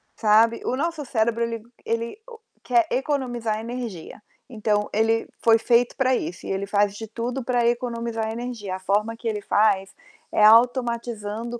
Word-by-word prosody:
sabe. 225 +2 +3
O - - 0
nosso 330 0 -2
cérebro 230 -1 0
ele 230 -1 -4 0.2
ele 230 - -3
o 460 -2 -12 0.2
quer 350 -2 +2
economizar 245 -5 -1
energia, 230 -6 -7 0.3
então 210 -3 0
ele 225 +1 +1 0.2
foi 225 -1 +6
feito 240 +1 +2
para 260 -1 +3
isso 175 -5 -5
e - - -3
ele 195 +1 -2
faz 200 0 +1
de 220 +1 -7
tudo 240 +4 -4
para 245 -1 +1
economizar 235 -2 -2
energia. 225 -5 -5
A - - -7
forma 210 +4 0
que 235 - -6
ele 210 -2 -2
faz 195 -2 +2 0.4
é 210 - +2
automatizando 235 -1 +2
230 Hz, 160 wpm, -24 LUFS, 215-245 Hz, 0.4 s, foi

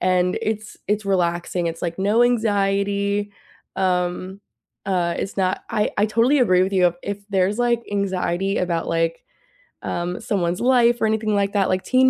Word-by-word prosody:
and 180 0 +1
it's 215 -1 -4
it's 210 +1 0
relaxing, 175 -2 0
it's 165 0 -4
like 170 0 -3
no 205 +5 +3
anxiety, 200 -3 +1 0.4
um, 185 0 -1 0.5
uh, 175 -3 0
it's 195 - -4
not 185 -1 0
I 215 -2 0
I 210 - +4
totally 235 +7 +3
agree 185 -7 +4
with 190 +1 -1
you, 180 -3 +3
if 200 0 -4
there's, 195 +2 +1
like, 240 -1 +1
anxiety 195 -1 -1
about, 170 -2 -1
like, 165 0 -1 0.6
um, 175 +1 -3
someone's 180 -3 -1
life 240 -1 +3
or - - +3
anything 215 -1 0
like 200 0 +1
that 195 -2 +2
like, 185 0 0
Teen 260 +5 +4
195 Hz, 165 wpm, -22 LUFS, 180-215 Hz, 0.6 s, I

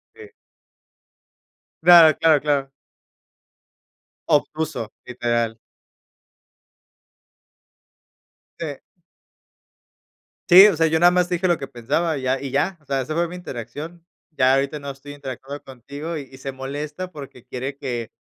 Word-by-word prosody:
Sí. 440 -1 -12 1.5
No. - - -21
Claro, 170 -4 +9
claro, 160 -3 +4
claro. 140 -2 0 1.6
Obtuso, 155 -5 0 0.2
literal. 120 -2 -1 3.0
Sí. 155 -4 -4 1.7
Sí, 190 +4 +10
o 200 - +2
sea, 160 +1 +3
yo 160 0 +1
nada 175 +1 +6
más 180 -1 +1
te 180 - +1
dije 185 +2 0
lo 175 -3 +2
que 135 - -7
pensaba 145 +6 -1
y 130 - -6
ya 130 +1 0
y 140 -2 -5
ya. 190 +6 0
O - - -28
sea, 135 -1 -1
esa 130 +4 -4
fue 170 +1 0
mi 180 - -8
interacción. 165 +2 -8 0.3
Ya 130 -3 +3
ahorita 140 +2 -1
no 140 -1 -7
estoy 140 +1 -9
interactuando 140 0 -8
contigo, 140 +6 -7
y 140 -3 -7
y 130 - -14
se 135 +1 -6
molesta 145 +7 -6
porque 135 -5 -11
quiere 130 +2 -5
que, 120 -5 -4
145 Hz, 140 wpm, -22 LUFS, 130-165 Hz, 3.0 s, Sí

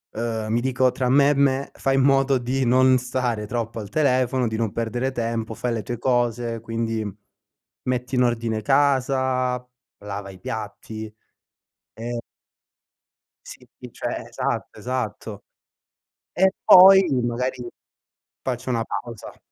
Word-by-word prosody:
ehm, 110 -1 -3
mi 120 - +1
dico 130 0 +2
tra 125 -2 -1
me 140 +2 +5
e 145 - +4
me: 140 -1 +1
“Fai 135 0 0
in 135 - +3
modo 135 0 +3
di 130 +2 -1
non 130 +1 +5
stare 125 -3 -2
troppo 115 0 -3
al 105 -2 -7
telefono, 130 -3 +1
di 110 - -3
non 110 -3 -1
perdere 120 +3 -2
tempo, 115 -2 -3
fai 125 -1 -2
le 115 - -2
tue 120 -1 -4
cose, 120 -1 0
quindi 115 -1 -2 0.8
metti 125 +1 -2
in 125 - +4
ordine 115 -2 -1
casa, 130 -1 +1 0.3
lava 100 -1 -7
i 95 - -12
piatti 110 +1 -6 0.8
e" 120 +2 -5 1.3
sì, - - -12 0.2
cioè, - - -4
esatto, - - -4
esatto. 115 -4 -4 0.9
E 190 +1 +3
poi, 190 +1 +9 0.2
magari, 125 +1 -2 0.8
faccio 130 0 -3
una 115 -2 +1
pausa. 115 -2 -7
120 Hz, 130 wpm, -23 LUFS, 115-130 Hz, 1.3 s, poi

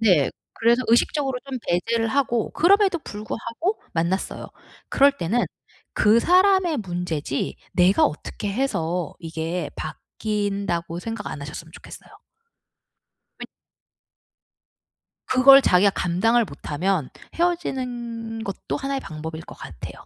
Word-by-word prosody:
네. 180 -11 +4 0.2
그래서 235 +2 +3
의식적으로 265 +3 +2
좀 260 - -3
배제를 225 +6 +1
하고 240 -3 0
그럼에도 385 0 +4
불구하고 230 - -4
만났어요. 170 +3 -2 0.4
그럴 280 0 +4
때는 210 +9 0 0.5
'그 220 +2 +5
사람의 365 -2 +4
문제지 175 -7 -3 0.2
내가 180 +2 +4
어떻게 200 +6 -3
해서 180 - -1
이게 165 +1 -4
바뀐다.'고 200 -5 -3
생각 225 +1 -5
안 145 - -6
하셨으면 155 +2 -8
좋겠어요. - - -12 1.3
네. - - -5 1.8
그걸 270 +2 +8
자기가 195 0 +4
감당을 225 +8 +2
못하면 155 +1 -2 0.3
헤어지는 245 -9 -2
것도 195 - -4
하나의 275 0 -2
방법일 160 -2 -7
것 - - -11
같아요. - - -9
220 Hz, 270 characters per minute, -23 LUFS, 175-260 Hz, 1.8 s, 그걸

